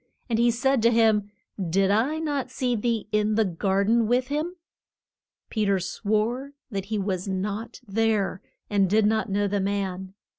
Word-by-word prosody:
And 225 - +2
he 240 +1 +4
said 265 +2 +2
to 230 - +5
him, 220 -3 +3 0.3
Did 190 +3 +2
I 245 +9 +2
not 290 -5 -2
see 250 -1 -1
thee 225 -1 -1
in 210 0 +2
the 220 0 +3
gar 190 +2 0
den 225 +2 +3
with 250 +3 +1
him? 310 +5 -2 1.0
Pe 215 - 0
ter 200 -1 +2
swore 220 +8 -1 0.2
that 195 -2 -3
he 215 +1 -2
was 190 -2 -2
not 205 +4 -3
there, 205 -2 0 0.3
and 200 -2 +2
did 215 +2 +3
not 220 +1 +1
know 205 +1 +1
the 200 0 0
man. 190 -1 -3
215 Hz, 175 wpm, -25 LUFS, 195-235 Hz, 1.0 s, to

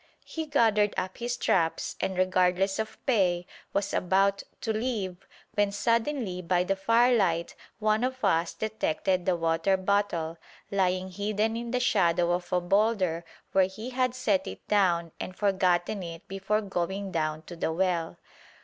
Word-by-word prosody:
he 320 -1 -5
gathered 220 -7 +3
up 185 +1 -3
his 240 0 -2
traps, 165 -8 0
and, 190 - -1
regardless 185 +1 +2
of 220 0 -4
pay, 180 -8 +2 0.3
was 200 0 -1
about 195 +2 +2 0.2
to 225 - -1
leave 215 -6 -3 0.3
when 205 -1 +2
suddenly 230 -2 0
by 180 0 +1
the 195 +2 0
firelight 200 -5 +2 0.2
one 215 +1 +1
of 260 -2 -1
us 165 -3 +1
detected 190 -4 -1
the 185 - +3
water 165 +3 +1
bottle, 185 -4 0 0.3
lying 185 -1 0
hidden 210 +3 -1
in 235 0 -4
the 250 +1 0
shadow 175 -7 +2
of 175 +1 -2
a 180 - +3
boulder 185 -2 +1 0.3
where 190 -1 +4
he 215 +6 -7
had 255 -1 0
set 210 -7 +1
it 95 - -9
down 175 -5 +2
and 185 - -5
forgotten 190 -1 +1
it 165 -2 -8
before 195 +2 -1
going 190 0 -3
down 155 -2 -1
to 175 - -9
the 165 - -1
well. 170 -1 0
190 Hz, 155 wpm, -28 LUFS, 175-215 Hz, 0.3 s, where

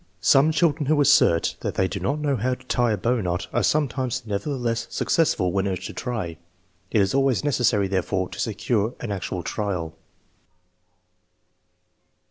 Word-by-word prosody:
Some 140 - +5
children 155 -2 +1
who 155 0 +3
assert 85 -11 +4
that - - -4
they 95 - +2
do 100 - -5
not 130 +11 -1
know 145 -2 0
how 125 +2 0
to - - -19
tie 120 -2 +1
a - - -1
bow 115 +4 0
knot 90 -1 -2
are - - +2
sometimes 130 -4 0
nevertheless 115 +2 -2
successful 120 - +1
when 100 +1 0
urged 95 -2 -3
to - - -6
try. 105 -10 -4 0.5
It 105 - +2
is 95 - +1
always 135 -2 +2
necessary, 120 -8 +2
therefore, 95 0 -1
to - - -9
secure 110 +1 -1
an 115 - -5
actual 95 -2 -4
trial. 90 -6 -3
115 Hz, 160 wpm, -24 LUFS, 95-135 Hz, 0.5 s, Some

